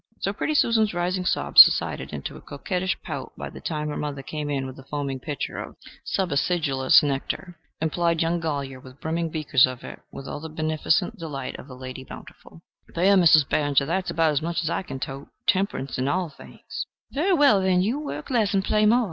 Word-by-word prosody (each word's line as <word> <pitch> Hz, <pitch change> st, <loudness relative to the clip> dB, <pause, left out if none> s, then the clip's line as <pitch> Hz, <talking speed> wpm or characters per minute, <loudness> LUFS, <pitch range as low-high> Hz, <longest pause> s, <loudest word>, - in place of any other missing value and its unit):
So 195 Hz, -, -1 dB
pretty 305 Hz, +9 st, -2 dB
Susan's 220 Hz, -8 st, +3 dB
rising 180 Hz, +1 st, -1 dB
sob -, -, +3 dB
subsided -, -, +7 dB
into -, -, -6 dB
a -, -, -11 dB
coquettish 185 Hz, 0 st, -3 dB
pout -, -, -6 dB
by -, -, -6 dB
the -, -, -11 dB
time 150 Hz, -2 st, -3 dB
her 150 Hz, -, -4 dB
mother 145 Hz, -2 st, -4 dB
came 150 Hz, 0 st, -4 dB
in 135 Hz, -2 st, -1 dB
with 130 Hz, -1 st, -7 dB
the 135 Hz, -, -12 dB
foaming 140 Hz, -1 st, -3 dB
pitcher 145 Hz, +1 st, -4 dB
of -, -, -7 dB, 0.3 s
subacidulous 150 Hz, -7 st, +2 dB
nectar, 145 Hz, +5 st, -3 dB, 0.2 s
and 160 Hz, 0 st, -1 dB
plied 170 Hz, -1 st, +1 dB
young 170 Hz, +1 st, 0 dB
Golyer 140 Hz, -5 st, -3 dB
with 130 Hz, +2 st, -14 dB
brimming 165 Hz, +1 st, -2 dB
beakers 155 Hz, -5 st, +3 dB
of 130 Hz, -1 st, -7 dB
it -, -, -9 dB
with 135 Hz, -, -9 dB
all 145 Hz, -, -5 dB
the 160 Hz, +1 st, -7 dB
beneficent 155 Hz, +4 st, 0 dB
delight 145 Hz, -5 st, -5 dB
of 140 Hz, -, -12 dB
a 130 Hz, -, -9 dB
Lady 130 Hz, 0 st, -8 dB
Bountiful. 165 Hz, +4 st, -13 dB, 0.3 s
"There, 190 Hz, +4 st, +4 dB
Mizzes 160 Hz, -5 st, +6 dB
Barringer! 145 Hz, -2 st, +2 dB
there's 180 Hz, +5 st, -1 dB
about 165 Hz, -1 st, +2 dB
as 145 Hz, 0 st, 0 dB
much 170 Hz, +1 st, -2 dB
as 165 Hz, -, -1 dB
I -, -, -1 dB
can 135 Hz, -8 st, -7 dB
tote. 135 Hz, +1 st, -6 dB, 0.2 s
Temperance 185 Hz, -10 st, 0 dB
in 130 Hz, -, 0 dB
all 180 Hz, +3 st, 0 dB
things." 145 Hz, -, -8 dB, 0.2 s
"Very 345 Hz, +8 st, +1 dB
well, 280 Hz, -, +5 dB
then, 185 Hz, -1 st, +3 dB
you 235 Hz, +9 st, 0 dB
work 295 Hz, -2 st, -6 dB
less 220 Hz, -4 st, +2 dB
and 190 Hz, -1 st, +1 dB
play 215 Hz, 0 st, +3 dB
more. 235 Hz, +3 st, +5 dB
160 Hz, 205 wpm, -25 LUFS, 140-185 Hz, 0.3 s, subsided